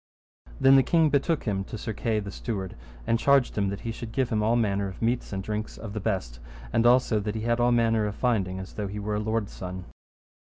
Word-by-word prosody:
Then 135 +1 +7
the - - +7
king 160 +3 +3
betook 145 +2 +1
him 100 -3 -1
to 110 - -7
Sir 110 +1 -4
Kay 110 +1 0
the 100 -1 -6
steward, 95 -3 -4 0.3
and 115 - +1
charged 140 -1 +3
him 100 -2 +1
that 100 +1 -5
he 115 - -3
should 115 0 -7
give 130 +1 0
him 110 - 0
of - - 0
all 115 - +3
manner 100 -4 +1
of 95 - -8
meats 120 +2 -1
and 95 -1 -3
drinks 105 +1 -4
of 105 -3 -7
the 110 - -3
best, 95 - -2 0.3
and 115 +1 +4
also 125 -3 +4
that 105 +1 -3
he 110 - -3
had 120 +1 0
all 120 0 +3
manner 115 -2 +2
of 105 - -4
finding 100 -7 0
as 95 0 -8
though 105 -1 -3
he 100 +2 -6
were 105 +1 -3
a 105 - 0
lord's 110 -1 -2
son. 90 -1 -6
110 Hz, 250 wpm, -27 LUFS, 100-120 Hz, 0.3 s, Then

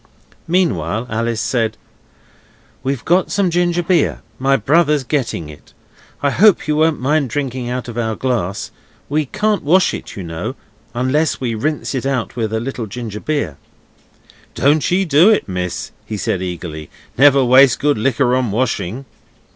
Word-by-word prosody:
Meanwhile 115 - 0
Alice 115 0 -1
said 115 -3 -1 1.0
'We've 135 -2 -3
got 180 +2 +2
some 195 -3 +1
ginger 175 0 +1
beer; 175 +1 +1 0.2
my 135 +1 +3
brother's 150 +4 +2
getting 120 - -2
it. 75 -1 -14 0.5
I 140 - +2
hope 205 0 +4
you 150 - +1
won't 160 0 +2
mind 140 +1 +1
drinking 130 -2 -3
out 125 0 -3
of 120 0 -5
our 110 -1 -1
glass. 110 -7 -2 0.4
We 150 0 0
can't 210 +5 0
wash 180 +6 +3
it, - - -7
you 95 - -6
know 85 +9 -5 0.4
unless 135 +6 +1
we 120 -3 -2
rinse 145 +9 -2
it 135 0 -2
out 130 -5 -2
with 110 -3 -2
a 110 - 0
little 120 -1 -4
ginger 110 -1 -6
beer.' 125 - -2 1.0
'Don't 145 +2 +2
ye 190 +2 +2
do 160 +5 +5
it, 220 - +2
miss,' 90 -2 -4
he 110 - -5
said 95 -2 -1
eagerly; 85 -4 -6 0.3
'never 140 0 +5
waste 130 0 +6
good 145 -5 +1
liquor 125 +2 +2
on 130 -3 0
washing. 115 +1 -2
130 Hz, 160 wpm, -18 LUFS, 110-150 Hz, 1.0 s, waste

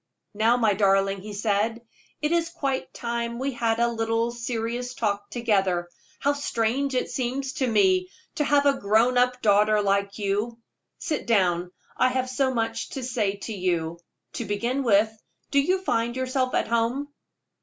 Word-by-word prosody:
"Now, 225 +3 +3
my 220 -4 +3
darling," 195 -1 +2
he 210 +2 -8
said, 210 +2 0 0.4
"it 300 - +1
is 335 -1 +1
quite 275 -6 -3
time 235 -1 -3
we 270 +3 -1
had 230 -2 0
a 235 - +4
little 225 0 0
serious 240 +1 -3
talk 205 -2 -2
together. 195 -7 0 0.3
How 285 - +1
strange 270 0 -1
it 250 - -1
seems 265 +2 -2
to 275 -4 -1
me 190 -5 +3 0.2
to 295 - 0
have 285 0 +3
a 275 -1 +3
grown 220 +5 +3
up 250 0 +2
daughter 210 +1 +4
like 200 0 0
you. 210 +3 -1 0.4
Sit 305 -6 -3
down; 180 -5 +2 0.3
I 255 - +3
have 255 0 -1
so 265 0 +1
much 225 -2 -2
to 265 - -4
say 225 -5 -1
to 225 - -4
you. 170 -3 -1 0.3
To - - -4
begin 235 +7 -1
with, 220 -3 +3 0.4
do 280 - +4
you 370 +6 0
find 235 -7 0
yourself 255 0 -1
at - - +1
home?" 235 +5 0
230 Hz, 165 wpm, -25 LUFS, 205-255 Hz, 0.4 s, a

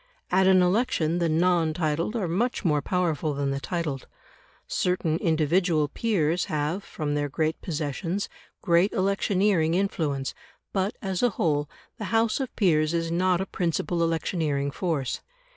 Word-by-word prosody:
At 190 +1 +4
an 185 -1 +6
election 180 -4 +1
the 170 -1 +1
non 165 -1 +2
titled 165 +5 -1
are 205 -6 -1
much 215 +7 -1
more 150 -3 +3
powerful 160 -3 0
than 140 -1 -1
the 135 - -2
titled. 155 -5 -3 0.6
Certain 180 -3 0
individual 160 -1 +2
peers 180 -4 0
have, 155 +6 -2
from 150 -6 -4
their 145 0 -1
great 155 +2 -1
possessions, 165 +4 -3 0.4
great 175 +4 +3
electioneering 190 -3 +2
influence, 155 -8 -1 0.4
but, 195 +2 0
as 190 -2 -1
a 245 - +4
whole, 145 -3 +1 0.3
the 215 - -3
House 225 +3 +1
of 265 -2 -4
Peers 160 -5 +2
is 165 0 -1
not 180 +1 +2
a - - -1
principal 170 -2 -1
electioneering 160 -4 0
force. 155 -6 -2
170 Hz, 145 wpm, -26 LUFS, 155-190 Hz, 0.6 s, an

